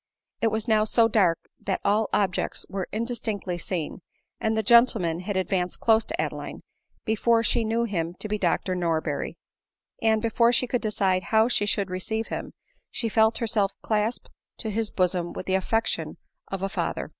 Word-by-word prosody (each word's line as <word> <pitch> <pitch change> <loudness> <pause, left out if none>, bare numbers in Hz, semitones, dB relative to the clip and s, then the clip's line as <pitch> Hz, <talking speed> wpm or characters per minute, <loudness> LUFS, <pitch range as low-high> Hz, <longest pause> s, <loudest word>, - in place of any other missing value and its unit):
It 230 - +3
was 220 +1 -1
now 215 -2 +4
so 225 +1 +3
dark 190 -7 +3 0.2
that 190 - -2
all 210 +1 +2
objects 195 -3 0
were 190 -2 -4
in 225 +2 -1
distinctly 210 -7 -3
seen, 175 -1 -4 0.4
and 220 0 0
the 220 - +1
gentleman 220 -7 +4
had 190 +2 -3
advanced 185 -1 -1
close 225 -1 +3
to - - -4
Adeline - - -4 0.4
before 230 +1 +2
she 230 +1 +2
knew 225 +2 0
him 175 -6 -2
to 215 - -5
be 210 0 -2
Dr 185 - 0
Norberry; 170 -3 -1 0.7
and, 220 -1 +3
before 230 +1 +3
she 245 +1 +3
could 245 0 -1
decide 195 -4 +1
how 220 0 +4
she 220 -4 +1
should 200 -2 0
receive 220 +5 -2
him, - - -5 0.4
she 230 - -2
felt 220 +1 +3
herself 215 -4 +1
clasped 215 +2 -1 0.3
to 220 - -3
his 220 +1 -1
bosom 180 -2 0
with - - -6
the 190 - -1
affection 225 +4 0 0.3
of 195 -1 -4
a - - +1
father. - - -2
215 Hz, 180 wpm, -26 LUFS, 185-225 Hz, 0.7 s, now